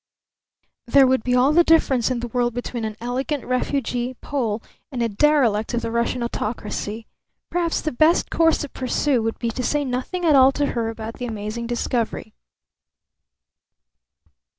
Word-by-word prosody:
There 270 +3 +6
would 260 -2 +2
be 250 0 +1
all 260 +4 +4
the 345 +2 +6
difference 275 -8 +3
in 250 -2 -2
the 240 - -3
world 240 0 0
between 240 -1 -4
an 215 -1 -5
elegant 255 +4 -3
refugee 255 -1 -1
Pole 235 -6 -3 0.3
and 255 - -4
a - - +2
derelict 235 -2 +2
of 240 - -2
the 230 - -3
Russian 235 +1 -1
autocracy. 220 -1 -4 0.5
Perhaps 340 -1 0
the 310 - -2
best 310 +7 +3
course 325 -1 +3
to 290 - -5
pursue 255 0 0
would 225 0 -2
be 235 -1 -2
to 255 - -4
say 290 +4 0
nothing 260 +8 -3
at 310 -3 +5
all 265 0 +7
to 290 - 0
her 230 -2 -1
about 225 0 -7
the 250 - -3
amazing 220 +1 -5
discovery. 235 -2 -2
245 Hz, 165 wpm, -22 LUFS, 230-275 Hz, 0.5 s, all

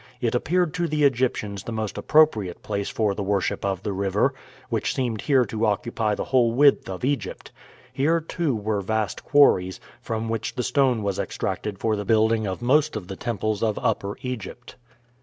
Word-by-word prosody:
It 120 -2 0
appeared 165 +6 +1
to 175 -1 -1
the 150 -1 0
Egyptians 120 -7 +1
the - - -6
most 110 -2 -3
appropriate 110 - +2
place 100 -1 -2
for 105 -3 0
the 100 - -4
worship 100 -2 -1
of 95 -1 -2
the 100 - -2
river, 100 +1 +1 0.3
which - - -1
seemed 120 -5 -1
here 135 -4 +3
to 110 -1 -1
occupy 105 +1 0
the - - -3
whole 120 -3 +2
width 140 -2 +4
of 95 +5 -4
Egypt. 140 +1 -3 0.4
Here, 160 +5 +2
too, 160 -3 -2
were 105 -1 -1
vast 110 +1 -2
quarries, 95 -11 +4 0.2
from 115 0 -3
which 115 +2 -3
the 125 - -1
stone 125 -3 +2
was 100 -2 -2
extracted 105 -2 -3
for 110 +2 0
the 105 - -3
building 110 +1 +2
of 95 +5 -4
most 150 +4 +3
of 100 -4 -6
the 95 - -5
temples 110 -1 -2
of 110 -2 0
Upper 105 -4 -1
Egypt. 120 -1 -6
110 Hz, 185 wpm, -24 LUFS, 100-130 Hz, 0.4 s, width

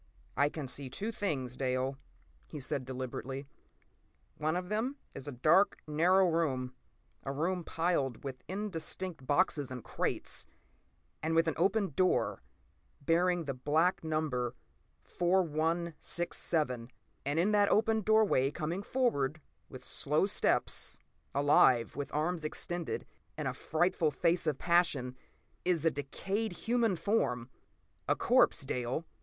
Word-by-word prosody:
p> - - -33 0.4
"I 145 - +4
can 155 -1 -5
see 130 +1 -6
two 205 - -3
things, 140 - -2
Dale," 130 +1 -1 0.5
he 150 - -7
said 130 -1 -2
deliberately. 130 +1 -5 0.9
"One 155 +2 0
of 180 0 -2
them 225 +6 -1 0.2
is 135 - -6
a - - -3
dark, 155 +10 +4
narrow 180 +5 +4
room—a 130 -6 -3
room 170 +5 -1
piled 165 -8 -1
with 130 -2 -6
indistinct 185 -5 -3
boxes 145 -3 +2
and 125 -3 -6
crates, - - -1 0.7
and 160 +1 0
with 165 0 +4
an 160 - +1
open 195 +3 +1
door 185 +6 +1 0.6
bearing 175 +3 +2
the 140 -3 -3
black 155 +9 +1
number 155 -6 -1 0.5
4167. 165 -6 0 0.3
And 145 +3 -1
in 190 +5 +3
that 205 -1 +4
open 220 0 +3
doorway, 215 -11 +3
coming 165 +5 -3
forward 155 - 0 0.3
with - - -10
slow - - +2
steps—alive, 135 -4 +2
with 145 0 -4
arms 160 +2 -1
extended 170 +2 -2 0.3
and 150 -3 -2
a 130 - -1
frightful 160 +4 +1
face 165 +4 +1
of 150 -3 +1
passion—is 170 0 -1
a 165 - +5
decayed 195 +10 -3
human 230 0 +1
form. 130 - 0 0.6
A - - +3
corpse, - - +3
Dale. 125 +6 -2
160 Hz, 125 wpm, -32 LUFS, 135-180 Hz, 0.9 s, a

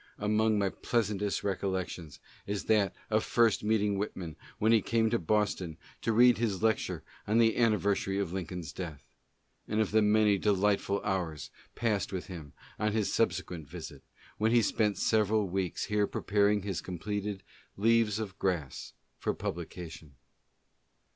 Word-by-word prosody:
Among 110 +1 +2
my 100 -1 +2
pieasantest 105 -3 -1
recollections 95 -5 -3 0.3
is 100 0 -2
that 105 -3 +2 0.2
of 110 0 +3
first 115 -4 +3
meeting 105 -2 +1
Whit 105 - -3
man 85 -5 -6 0.2
when 110 +2 +3
he 115 -2 +5
came 110 +1 +1
to 120 - +2
Boston 95 -3 0 0.2
to 115 - 0
read 120 +1 +6
his 110 -4 -1
lecture 110 -1 0 0.2
on 105 +2 +2
the 115 -1 +5
anniver 105 -4 +3
sary 95 0 -2
of 95 -3 -2
Lincoln's 90 -5 -5
death, 80 -6 -7 0.6
and 105 - -1
of 110 - +1
the 110 +1 +4
many 105 -1 +4
delightful 100 0 +1
hours 85 -6 -2 0.2
passed 110 -4 0
with 95 -2 -4
him 80 -6 -9 0.3
on 105 0 +1
his 110 -2 0
subsequent 90 -7 -1
visit, 80 -4 -8 0.4
when 110 +1 +3
he 120 -1 +5
spent 105 0 +1
several 110 -1 +2
w 95 0 -1 0.2
here 105 -1 +1
preparing 105 0 +1
his 95 -3 -3
completed 100 +2 -4 0.3
'Leaves 110 0 +3
of 100 -3 -5
Grass" 85 -9 -2 0.3
for - - -1
publica 90 -1 -5
tion. 80 -3 -12
100 Hz, 155 wpm, -30 LUFS, 95-110 Hz, 0.6 s, read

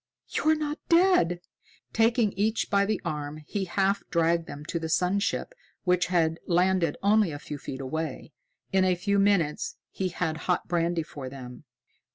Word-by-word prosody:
"You're 315 0 +2
not 300 0 -3
dead?" 335 - +4 0.5
Taking 225 -1 +3
each 215 +4 0
by 200 -1 +3
the 215 -2 0
arm, 150 0 -4
he 195 +4 -2
half 195 +2 +1
dragged 170 -1 +2
them 145 +1 -8
to 170 - -2
the 160 -1 -4
sun 180 +4 +2
ship, 225 - -2 0.3
which 180 -1 +2
had 165 -2 +1
landed 180 -2 +2
only 205 -3 +4
a 145 - -5
few 145 0 -7
feet 130 0 -6
away. 160 +4 -4 0.4
In 190 -1 +4
a 185 -1 +3
few 200 +3 +1
minutes 200 - +1 0.2
he 190 -1 -2
had 165 -3 -2
hot 180 - +1
brandy 170 -1 0
for 140 -4 -8
them. 130 0 -10
180 Hz, 170 wpm, -27 LUFS, 160-200 Hz, 0.5 s, dead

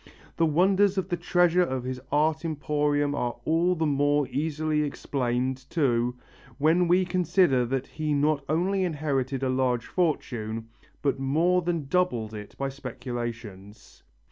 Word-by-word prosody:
The 165 - +2
wonders 190 +5 +3
of 190 -1 -1
the 175 - +1
treasures 175 0 +2
of 130 -1 -2
his 130 0 -5
art 155 +2 +2
emporium 145 -2 0
are 120 -4 -2
all 170 +3 +2
the 160 -1 0
more 145 -1 +2
easily 155 +1 -1
explained, 130 -3 -2
too, 125 -6 +1 0.4
when 165 +4 +3
we 180 +2 +3
consider 175 -7 +2
that 130 +1 -2
he 155 -1 -4
not 145 0 +1
only 185 +5 +1
inherited 140 -5 -1
a 130 - +1
large 130 -2 0
fortune, 115 -10 -2 0.3
but 140 -2 +1
more 165 +7 +2
than 170 -3 -2
doubled 130 -9 0
it 105 -1 -9
by 135 - -1
speculations. 120 -6 -7
145 Hz, 140 wpm, -27 LUFS, 130-170 Hz, 0.4 s, wonders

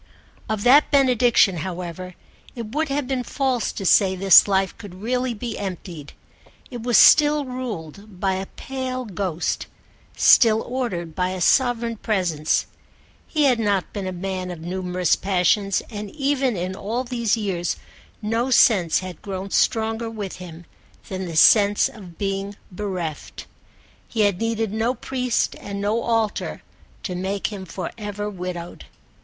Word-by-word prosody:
Of 215 -2 -2
that 275 +5 +6
benediction, 245 - +4
however, 180 +1 -6 0.4
it 230 -2 -7
would 310 +1 0
have 275 -1 -1
been 260 -1 -1
false 255 -1 -1
to 195 - -6
say 190 +1 +4
this 190 0 +7
life 195 -1 +1
could 200 -4 -10
really 245 +4 -2
be 230 +1 -5
emptied: 175 -6 -7 0.6
it 240 -2 -6
was 240 0 +3
still 295 -1 +6
ruled 210 - -7
by 190 0 +1
a 190 +1 -4
pale 255 -1 -5
ghost, 185 -4 -3 0.5
still 225 -2 +6
ordered 190 -11 -3
by 180 +2 -1
a 185 0 -4
sovereign 235 +3 +2
presence. 175 -8 0 0.6
He 305 -2 0
had 255 -4 +3
not 200 -4 0
been 200 -3 -4
a - - -2
man 185 0 -4
of 175 -2 -7
numerous 180 0 0
passions, 195 +1 +1
and 210 -1 -6
even 275 -5 0
in 185 +2 -3
all 225 +6 -3
these 235 -3 0
years 185 -5 -2 0.5
no 230 +4 0
sense 195 -10 +4
had 185 -3 -8
grown 195 0 -6
stronger 225 +1 +1
with 210 -4 -6
him 175 -2 -10 0.4
than 190 -1 -4
the 165 - -6
sense 205 +4 +5
of 180 -5 -13
being 195 0 -3 0.2
bereft. 180 -5 -5 0.6
He 225 - -2
had 200 -3 +2
needed 225 -2 -1
no 225 +4 0
priest 250 0 -1
and 200 0 -6
no 210 +3 0
altar 225 -3 -1 0.4
to 185 - -3
make 190 +3 -3
him 190 -2 -7
for 180 +1 -5
ever 205 0 -4
widowed. 180 -2 -7
205 Hz, 150 wpm, -22 LUFS, 185-235 Hz, 0.6 s, this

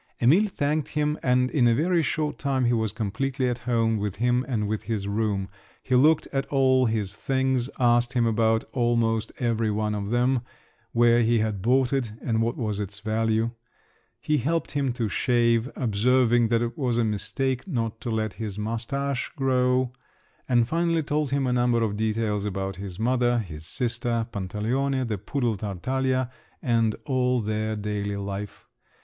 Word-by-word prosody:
Emil 165 - +5
thanked 150 -4 -1
him, 150 0 0
and 125 0 +2
in 130 -6 +3
a 115 - +4
very 170 +5 +2
short 155 -1 -2
time 135 -3 0
he 120 - +3
was 110 -2 0
completely 130 +5 -2
at 120 0 -1
home 115 -2 +2
with 105 -2 -3
him 125 +3 +1
and 110 -6 -1
with 110 0 -2
his 105 -4 -3
room; 100 -2 -1 0.4
he 130 - -2
looked 150 +5 +4
at 135 0 -1
all 130 -2 +3
his 105 -3 -1
things, 130 +1 0
asked 120 0 +3
him 120 -2 +2
about 110 0 +2
almost 115 -2 +1
every 115 -2 0
one 105 0 -1
of 100 -1 -3
them, 125 +2 +2 0.5
where 120 0 +4
he 115 +1 +3
had 110 -3 -1
bought 125 +4 +2
it, 125 -6 -1
and 115 -2 0
what 115 +1 -1
was 105 -4 -2
its 100 0 -4
value. 110 +1 0 0.7
He 150 -1 +1
helped 165 +7 -1
him 140 -3 0
to 120 -3 -1
shave, 115 +2 +2
observing 120 +1 +3
that 115 +1 +2
it 120 - -3
was 125 -4 0
a 120 - +3
mistake 125 - -2
not 115 - -2
to - - -4
let 110 -2 -1
his 105 -3 -5
moustache 125 +5 -2
grow; 130 -2 +1 0.6
and 120 -2 +3
finally 165 +1 +1
told 150 0 -1
him 140 0 0
a 125 - +1
number 120 -1 +2
of 105 -2 -1
details 110 -1 -1
about 95 -2 -3
his 95 -2 -7
mother, 120 +1 +2
his 80 -8 -5
sister, 120 -1 -1
Pantaleone, 120 +7 -1
the 105 -4 -3
poodle 120 -2 -1
Tartaglia, 130 +6 -1 0.3
and 115 -3 +1
all 125 -2 +1
their 110 0 -2
daily 100 -1 -3
life. 100 +1 -6
120 Hz, 170 wpm, -25 LUFS, 110-130 Hz, 0.7 s, Emil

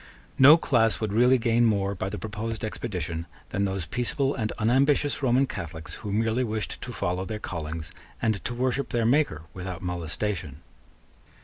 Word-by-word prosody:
No 140 +5 +10
class 115 -8 +2
would 110 -2 -2
really 125 +4 +5
gain 120 0 +2
more 100 -3 +2
by 95 0 -3
the 105 - -5
proposed 110 +1 -4
expedition 90 -7 -4 0.2
than 100 - 0
those 95 -3 -2
peaceable 135 - 0
and 110 -4 -2
unambitious 135 +6 +2
Roman 130 0 +3
Catholics 80 - -6
who 105 - -4
merely 110 +4 +1
wished 110 -2 -3
to 125 - -6
follow 90 -4 -2
their 105 +3 -4
callings 80 -5 -5 0.3
and 110 -3 0
to 120 - -2
worship 130 +2 0
their 120 -1 0
Maker 120 - +2
without 90 -1 -6
molestation. 85 -2 -3
110 Hz, 165 wpm, -26 LUFS, 90-120 Hz, 0.3 s, No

